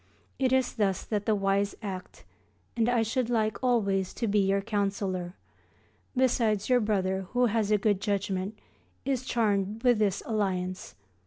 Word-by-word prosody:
It 260 -2 +2
is 260 -1 +2
thus 195 -4 +1
that 205 -2 -3
the 215 - +3
wise 200 0 +1
act, 185 -3 -7 0.5
and 230 0 +2
I 240 -2 +3
should 240 +2 -1
like 220 -1 0
always 200 -7 +1
to 230 - -1
be 205 0 +2
your 195 0 +2
counsellor. 195 -4 -2 0.8
Besides, 230 -5 +2
your 250 -1 +5
brother, 190 -3 0
who 245 0 +3
has 220 -2 +1
a 210 - +4
good 205 -1 +1
judgment, 200 0 -2 0.5
is 265 -2 0
charmed 215 -3 0
with 245 -3 +4
this 200 -2 +1
alliance. 185 -4 -2
210 Hz, 155 wpm, -28 LUFS, 195-230 Hz, 0.8 s, your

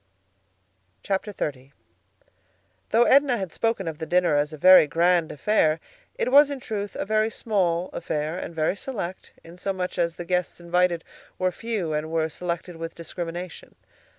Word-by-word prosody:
XXX 150 -10 -3 1.2
Though 230 +2 +5
Edna 270 0 +4
had 190 -5 -4
spoken 225 -5 -1
of 160 -2 -5
the 160 - -5
dinner 175 -3 +3
as 145 +1 +1
a 155 - -8
very 185 0 +8
grand 170 +1 +2
affair, 160 -2 +2 0.4
it - - -1
was 285 +1 +7
in 280 -2 -4
truth 205 -4 -5
a - - -3
very 215 +1 +2
small 185 -6 0
affair 155 -1 -3
and 170 - -6
very 160 +3 +1
select, 200 -6 -6
in 170 +2 -13
so 195 - -1
much 185 -1 -4
as 170 -1 +1
the 175 - -7
guests 180 0 -1
invited 175 0 +1 0.3
were 185 0 +1
few 200 -5 -3
and 150 +1 -2
were 160 -1 0
selected 175 +1 -5
with 165 0 -6
discrimination. 170 +1 -7
180 Hz, 160 wpm, -25 LUFS, 165-200 Hz, 1.2 s, very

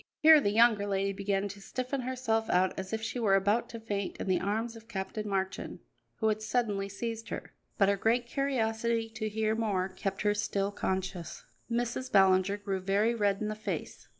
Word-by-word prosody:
Here 315 -1 +8
the 205 - +2
younger 215 -1 +4
lady 195 0 0
began 200 0 -1
to 200 +1 -9
stiffen 255 +6 -3
herself 240 -3 -1
out 185 +1 +3
as 190 0 -5
if 220 0 -2
she 245 - -3
were 205 -4 +4
about 205 +4 +2
to 230 - -7
faint 205 -3 -3
in - - -4
the 185 -1 +2
arms 220 +4 -2
of 225 0 -13
Captain 210 0 -4
Marchand, 190 -1 -2 0.4
who 220 - +1
had 215 0 -1
suddenly 210 -3 -1
seized 225 +2 -5
her; - - -6 0.2
but 195 - +4
her 200 0 +2
great 235 +4 +2
curiosity 235 -4 0
to 220 -1 -4
hear 215 +1 0
more 205 -5 0
kept 195 +1 -4
her 205 0 +3
still 200 -1 -1
conscious. 190 -3 -3 0.2
Mrs. 240 +2 -2
Ballinger 190 0 +4
grew 200 -2 -3
very 200 +5 +2
red 205 -3 +1
in 215 - -1
the 215 - -2
face. 215 +1 -5
210 Hz, 195 wpm, -30 LUFS, 195-230 Hz, 0.4 s, Here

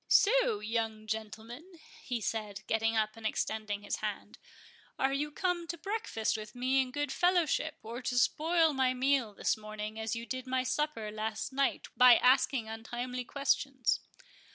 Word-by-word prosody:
"So, - - +4
young 220 -1 -2
gentleman," 220 - -6 0.3
he 245 -3 -3
said, 215 -2 -3
getting 225 0 +1
up 215 -1 +2
and 225 - -12
extending 215 -1 -2
his 205 - -2
hand, - - -5 0.6
"are 270 0 +1
you 295 +2 -1
come 345 +2 -1
to 340 - -4
breakfast 395 - -2
with 215 +1 -7
me 260 +2 +2
in 260 - -3
good 290 +1 -2
fellowship, 340 -2 +2
or 230 +3 -6
to 250 0 -2
spoil 320 +5 +3
my 260 -1 +2
meal 255 -5 +1
this - - +1
morning, 215 0 -6
as 220 +1 -2
you 230 0 -5
did 255 +1 -5
my 255 0 +1
supper 255 -5 -1
last 220 +3 -3
night, 275 +1 0
by 250 -1 +8
asking 255 -2 +3
untimely 240 +3 -4
questions?" 275 -1 0
250 Hz, 160 wpm, -32 LUFS, 220-280 Hz, 0.6 s, by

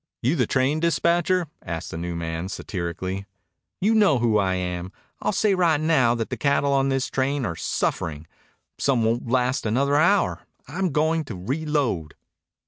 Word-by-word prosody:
"You 130 +8 +2
the 125 -8 +1
train 135 +4 +1
dispatcher?" 170 +2 +2 0.2
asked 85 0 -5
the - - -5
new 85 0 -4
man 85 +2 -4
satirically. 95 0 -4 0.5
"You 210 +4 +2
know 205 -10 +4
who 115 -3 +2
I 95 -2 +1
am. 90 0 -3 0.3
I'll - - +1
say 210 0 +2
right 170 -5 +3
now 145 -7 +3
that 115 -2 -3
the - - -2
cattle 140 0 +2
on 135 0 +2
this 135 -1 0
train 135 0 -1
are 85 - -3
suffering. 80 -1 -2 0.5
Some 130 -5 +2
won't 115 +2 0
last 130 +2 +1
another 140 +6 +2
hour. 185 +6 +3 0.3
I'm 180 +4 -1
goin' 160 +2 +1
to 115 - -6
reload." 125 - -2
130 Hz, 165 wpm, -24 LUFS, 95-155 Hz, 0.5 s, know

